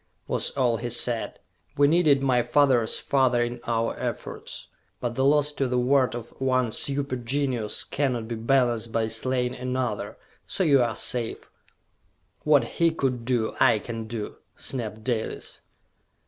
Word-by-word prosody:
was - - 0
all 120 -4 +2
he 120 +2 -4
said. 120 0 0 0.4
"We 145 0 +5
needed 150 -4 +4
my 125 -2 +3
father's 130 -4 +3
father 130 -3 +2
in 120 0 -4
our 115 -1 0
efforts! - - -5 0.3
But 120 -1 -2
the 130 - 0
loss 145 +1 +3
to 135 -2 -1
the 125 0 0
world 130 0 +2
of 120 -1 -7
one 130 -3 +1
super 140 +1 -1
genius 125 -3 -1
cannot 125 -6 -1
be 120 - -4
balanced 115 -1 +1
by 110 0 0
slaying 125 +2 0
another 125 -3 -3 0.3
so - - -1
you 140 -6 +5
are 120 - 0
safe! 120 -3 -1 0.9
"What 150 -4 +4
he 165 +8 +1
could 130 -7 -2
do, 120 -3 0
I - - +5
can 115 0 -6
do!" 110 -2 -5 0.2
snapped 110 -4 -4
Dalis. 115 -3 -3
125 Hz, 150 wpm, -26 LUFS, 115-135 Hz, 0.9 s, We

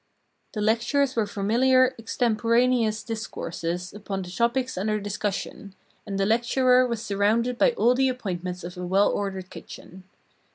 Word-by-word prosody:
The 210 - -2
lectures 240 +6 +1
were 220 -3 +1
familiar, 255 +6 +3
extemporaneous 230 0 +1
discourses 180 -5 -5
upon 200 -2 -5
the 180 - -9
topics 235 +6 0
under 215 +3 -1
discussion, 205 -1 -4 0.3
and 195 - -3
the 195 - +2
lecturer 250 +3 +3
was 235 -2 -3
surrounded 225 +5 0
by - - +4
all 250 - +3
the 265 +1 +2
appointments 180 -7 -4
of 175 +2 -7
a 180 - -5
well 190 +3 +3
ordered 190 -2 -4
kitchen. 185 +1 -11
215 Hz, 140 wpm, -25 LUFS, 195-245 Hz, 0.3 s, by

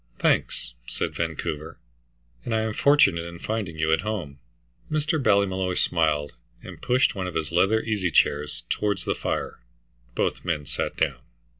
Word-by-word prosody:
"Thanks," - - 0
said - - -3
Vancouver, 80 -1 -3 0.7
"and 115 - -1
I 110 - +2
am 110 -1 -2
fortunate 125 -12 +4
in 85 0 -8
finding 100 -4 -3
you 80 0 +1
at 80 - +2
home." 90 -10 -4 0.5
Mr. 155 0 0
Ballymolloy 95 -4 +2
smiled, 75 -5 +1 0.3
and - - -10
pushed 125 +1 +3
one 95 -4 -3
of 90 - -6
his 80 -1 -2
leather 95 +6 +3
easy 105 -5 0
chairs 75 -1 +1
towards 100 -4 -1
the - - +1
fire. - - -3 0.6
Both - - -1
men 80 -5 -1
sat - - -3
down. 70 -6 0
90 Hz, 155 wpm, -25 LUFS, 80-110 Hz, 0.7 s, fortunate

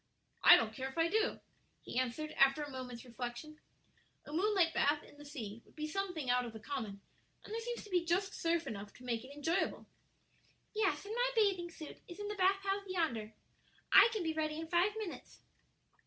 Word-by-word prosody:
"I - - +11
don't 220 -1 -1
care 265 +3 -4
if 265 - -13
I 330 0 +3
do," 430 +2 +1 0.4
he 245 - -2
answered, 255 +5 -2
after 275 +2 +4
a 290 - -7
moment's 255 -2 -7
reflection: 245 +5 -6 0.7
"a 295 - -9
moonlight 370 -1 +3
bath 295 +1 +2
in 290 - -16
the 290 - -11
sea 230 -7 -7
would - - -24
be 305 -1 -3
something 345 -3 -3
out 250 0 +3
of 235 -2 -6
the 220 - -8
common; 215 -5 -5 0.4
and 420 - -8
there 455 - -2
seems 480 +1 -4
to 420 - -12
be 355 -2 +3
just 370 +4 0
surf 335 0 0
enough 200 -1 -6
to 250 - -14
make 235 -2 -2
it 260 - -11
enjoyable." 325 +6 -1 0.9
"Yes; 425 -2 +1
and 420 - -5
my - - +2
bathing 390 -6 +2
suit 320 -2 -10
is 350 +3 -10
in 415 0 -4
the - - -2
bath 390 0 +3
house 395 +1 0
yonder. 235 - -1 0.6
I - - +9
can 435 -5 -2
be 320 -1 0
ready 310 0 -1
in 325 0 -6
five 360 +5 +3
minutes." 420 -6 -7
315 Hz, 205 wpm, -35 LUFS, 255-385 Hz, 0.9 s, I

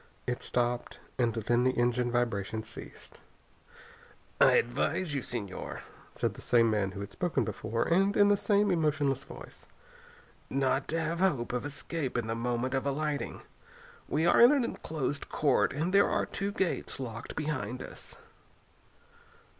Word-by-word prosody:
It 125 0 -2
stopped, 120 0 -1 0.2
and 120 -2 +3
then 120 +2 +1
the 130 0 +1
engine 120 0 +1
vibration 110 -3 -1
ceased. 110 - -11 1.2
"I - - +7
advise 160 +7 +1
you, 140 - -1
Señor," 105 -7 -4 0.3
said - - -1
the - - -11
same 115 -2 +4
man 100 -3 0
who 100 - -6
had 100 - -7
spoken 175 -2 0
before, 110 +2 -2
and 195 +4 +3
in 205 - +6
the 205 - +5
same 205 0 +2
emotionless 150 -5 +1
voice, - - -12 0.8
"not 135 0 +1
to 165 - -1
have 165 +1 -2
hope 135 -12 +1
of 125 +2 -2
escape 145 -1 -3
in 120 - -1
the 115 - -2
moment 120 +2 -1
of 135 +1 0
alighting. 145 +1 -2 0.7
We 160 +2 +1
are 175 - +5
in 240 +3 +9
an 285 -4 +3
enclosed 145 - -3
court 145 -4 +2
and 165 +6 -2
there 200 0 +5
are - - +1
two 200 0 -3
gates 190 -7 -1
locked 115 -3 -6
behind 130 -6 -3
us." - - -8
135 Hz, 155 wpm, -30 LUFS, 120-165 Hz, 1.2 s, in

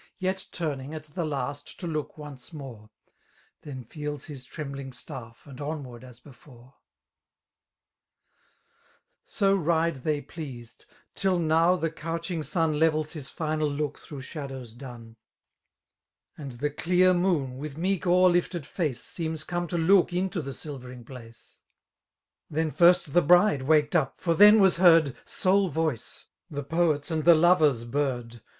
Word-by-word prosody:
Yet 190 0 -2
turning, 150 -3 -4
at 155 - -7
the 155 +3 -5
laeti 145 -1 -4
to 180 - -7
look 155 -3 -4
once 145 -3 -10
more; 130 -9 -10 0.7
Then 130 -4 -8
feels 150 +3 -6
his 135 -4 -9
treml^ng^ffft 135 -4 -8 0.2
andtmward 140 -4 -6
as 125 -2 -13
before/ 125 -1 -17 2.5
So 195 -2 +2
ride 165 -3 +1
they 150 +3 -1
pleased, 135 -6 -9 0.2
— - - -42
tiU 190 -2 +1
now 165 +2 +3
the 165 -3 -2
couching 165 +2 -4
snn 155 0 0
I^evek 155 -1 +2
his 150 -5 -7
final 155 -1 -1
look 145 0 -3
through 145 -3 -9
shadows 135 -5 -7
dun; 120 -3 -11 0.5
* - - -59
And 140 -4 -8
the 145 +5 -2
dear 180 +4 +3
moon, 165 -8 0
with 150 0 -6
meek 185 +1 -1
o'er 180 +1 +5
lifted 175 -2 +1
iieuse. 155 -2 -2
Seems 160 +4 -5
come 175 +1 -3
to 175 - -2
look 180 +3 +4
into 180 0 -1
the 135 -2 -6
silvering 125 -5 -8
place. 115 -3 -14 0.9
Then 155 0 -1
first 170 -4 +4
the 175 - +5
bride 175 -1 +5
waked 150 +3 +2
up, 145 -6 +1
for 170 - +1
then 210 +5 +8
was 190 -3 +4
heard. 165 -6 +5
Sole 190 0 +2
voke, 160 -6 -3 0.3
Uie 145 -2 -5
poet's 165 -2 +1
and 160 -1 -1
the 170 +1 +7
lover's 155 -7 +4
bird. 120 -3 -3
155 Hz, 145 wpm, -27 LUFS, 135-170 Hz, 2.5 s, then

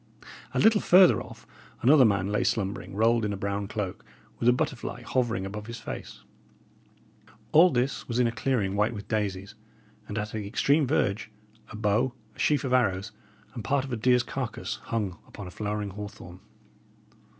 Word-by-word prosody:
A - - +2
little 220 -2 +5
further 185 0 +6
off, - - -12 0.4
another 135 +1 +7
man 100 -2 +1
lay 105 - +1
slumbering, 100 -1 -2
rolled 115 +2 +3
in 105 - -1
a - - -4
brown 100 +1 -2
cloak, 100 -3 -4 0.4
with 120 - +4
a - - +8
butterfly 125 - -3
hovering 115 -7 -1
above 105 +2 -6
his 115 0 -7
face. - - -8 1.3
All 170 +4 +7
this 130 -1 -1
was 120 - -2
in 125 - +4
a 115 - +1
clearing 110 -5 -1
white 105 +3 +1
with 100 -1 -8
daisies; 100 -2 -2 0.5
and 105 - -5
at 105 0 -3
the 105 -2 -4
extreme 140 +6 +2
verge, 110 -6 0 0.4
a - - -9
bow, 110 +4 +1 0.2
a - - -19
sheaf 150 -1 +2
of 130 -2 -1
arrows, 100 -7 +1 0.4
and 115 - -6
part 135 +3 +1
of 135 - -6
a - - +1
deer's 125 +2 +3
carcase, 125 -2 -4
hung 105 -6 -2
upon 105 - -9
a 90 - -8
flowering 105 0 -3
hawthorn. 95 -3 -9
110 Hz, 175 wpm, -27 LUFS, 100-125 Hz, 1.3 s, a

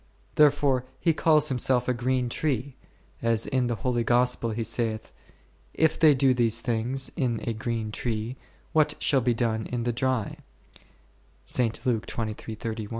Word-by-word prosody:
Therefore 145 -3 +3 0.2
He 165 - +2
calls 155 -1 +4
Himself 125 -1 +1
a 125 - +2
green 125 +1 0
tree, 135 0 -2 0.5
as 115 -1 +1
in 130 -2 0
the 120 - -1
holy 120 +2 -1
Gospel 120 0 +2
He 115 +1 -2
saith, 110 -1 -2 0.6
If 160 0 +2
they 155 -3 +6
do 130 0 +3
these 115 -2 +2
things 120 +3 -1
in 120 -4 -1
a 115 - 0
green 115 -1 -3
tree, 115 +2 -3 0.4
what 155 -1 +3
shall 135 -3 +2
be 120 0 +1
done 110 -2 -1
in 120 -1 -3
the 120 0 -1
dry 130 -3 -1 1.2
e? 110 -2 -3
120 Hz, 145 wpm, -26 LUFS, 115-130 Hz, 1.2 s, they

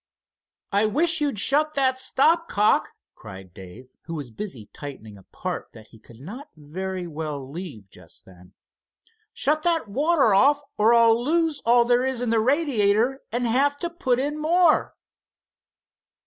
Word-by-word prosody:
"I 205 +2 +2
wish 320 +8 +2
you'd 285 -6 -1
shut 300 +8 +2
that 260 -2 +1
stop 315 +6 +1
cock!" 210 +1 +2 0.2
cried 95 -2 -12
Dave, 95 +8 -13 0.2
who 165 - -6
was 140 -6 -7
busy 135 - -7
tightening 130 -8 -10
a 100 - -15
part - - -7
that 110 -1 -15
he 115 - -18
could 115 +1 -17
not 240 - -10
very 180 +5 -6
well 150 -4 -6
leave 145 - -9
just - - -17
then. 90 -1 -18 0.8
"Shut 305 +2 0
that 330 -5 0
water 280 +1 +2
off, 280 +9 +4 0.2
or 225 +3 +4
I'll 230 0 +4
lose 325 +1 0
all 240 0 +5
there 245 +1 +2
is 260 -2 -2
in 245 -2 -2
the 230 - +2
radiator, 250 -2 +1
and 240 +2 -1
have 275 +5 +1
to 345 +3 -4
put 260 -8 -1
in 295 +3 -3
more." 335 +1 +2
230 Hz, 160 wpm, -23 LUFS, -, 0.8 s, all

